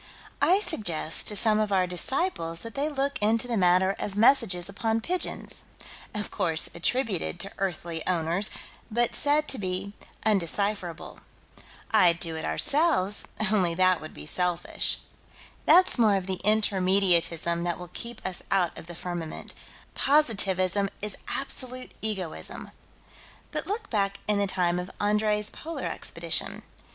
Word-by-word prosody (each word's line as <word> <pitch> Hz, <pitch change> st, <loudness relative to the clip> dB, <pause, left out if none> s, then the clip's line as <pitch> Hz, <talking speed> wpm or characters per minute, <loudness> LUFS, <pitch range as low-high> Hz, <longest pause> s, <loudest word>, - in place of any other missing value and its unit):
I 380 Hz, +4 st, +4 dB
suggest 175 Hz, -, +3 dB
to 210 Hz, -, +2 dB
some 215 Hz, 0 st, +6 dB
of 215 Hz, -1 st, -1 dB
our 190 Hz, -2 st, +2 dB
disciples 180 Hz, -, +4 dB
that 230 Hz, -1 st, -8 dB
they 285 Hz, +2 st, -1 dB
look 280 Hz, -1 st, -2 dB
into 225 Hz, +3 st, +2 dB
the 240 Hz, -, -2 dB
matter 185 Hz, 0 st, +3 dB
of 200 Hz, -, -4 dB
messages 210 Hz, -6 st, +3 dB
upon 220 Hz, +3 st, -2 dB
pigeons, 355 Hz, +10 st, -4 dB, 0.5 s
of 210 Hz, 0 st, -4 dB
course 170 Hz, -6 st, 0 dB
attributed 190 Hz, -1 st, -1 dB
to 195 Hz, -, -4 dB
earthly 170 Hz, -3 st, -3 dB
owners, 175 Hz, +3 st, +1 dB, 0.4 s
but 240 Hz, +1 st, 0 dB
said 300 Hz, +1 st, +4 dB
to 265 Hz, -, +1 dB
be 190 Hz, +1 st, -3 dB, 0.3 s
undecipherable. 200 Hz, -3 st, -1 dB, 0.7 s
I'd 175 Hz, -6 st, +4 dB
do 165 Hz, -2 st, -2 dB
it, 160 Hz, -, -5 dB
ourselves, 210 Hz, -, +1 dB, 0.3 s
only 180 Hz, -6 st, +1 dB
that 185 Hz, 0 st, +2 dB
would 155 Hz, -, -10 dB
be 75 Hz, -, -9 dB
selfish. 180 Hz, -, -1 dB, 0.7 s
That's 365 Hz, -7 st, +5 dB
more 215 Hz, -3 st, +4 dB
of 190 Hz, -2 st, -2 dB
the 185 Hz, -1 st, -3 dB
Intermediatism 185 Hz, -5 st, +2 dB
that 175 Hz, -1 st, -2 dB
will 180 Hz, -1 st, -11 dB
keep 235 Hz, -1 st, -8 dB
us 185 Hz, -1 st, -2 dB
out 180 Hz, -4 st, +1 dB
of -, -, -13 dB
the 175 Hz, -, -7 dB
firmament: 175 Hz, -2 st, -6 dB, 0.4 s
Positivism 200 Hz, -, +1 dB
is 210 Hz, -, -3 dB
absolute 255 Hz, -2 st, -3 dB
egoism. 195 Hz, -6 st, -5 dB, 0.8 s
But -, -, -4 dB
look 425 Hz, +2 st, -4 dB
back 200 Hz, -3 st, 0 dB
in 210 Hz, -1 st, +1 dB
the 200 Hz, -, +1 dB
time 180 Hz, -2 st, 0 dB
of 180 Hz, +1 st, -6 dB
Andrée's 210 Hz, 0 st, 0 dB
Polar 330 Hz, +1 st, -7 dB
Expedition. -, -, -2 dB
195 Hz, 145 wpm, -26 LUFS, 175-225 Hz, 0.8 s, some